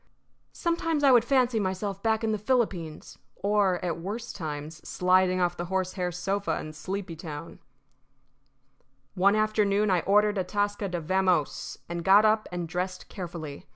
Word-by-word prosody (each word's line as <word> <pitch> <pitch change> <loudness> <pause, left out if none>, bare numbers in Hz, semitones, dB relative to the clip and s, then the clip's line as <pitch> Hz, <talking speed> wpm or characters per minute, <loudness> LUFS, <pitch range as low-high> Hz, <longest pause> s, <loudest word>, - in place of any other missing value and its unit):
Sometimes 330 -3 0
I 275 - +7
would 240 -3 +6
fancy 250 -2 +2
myself 195 0 -2
back 220 0 +1
in 220 - +1
the 215 - -1
Philippines, 200 -9 -1 0.2
or, 200 -3 +2
at 170 -2 -2
worse 215 +7 -5
times, 155 -2 -6
sliding 185 0 +2
off 175 -1 +1
the 175 - -4
horsehair 185 0 -2
sofa 180 -1 -2
in 155 - -7
Sleepytown. 165 -4 -6 1.5
One 200 +3 +4
afternoon 215 -1 +2
I 180 - +3
ordered 205 +3 +3
Atasca 205 +1 -1
to 175 - -1
vamose, 185 -2 0
and 170 0 -4
got 200 +4 +6
up 215 0 +2
and 175 -1 -3
dressed 180 +2 -4
carefully. 170 -7 -7
190 Hz, 145 wpm, -27 LUFS, 175-210 Hz, 1.5 s, I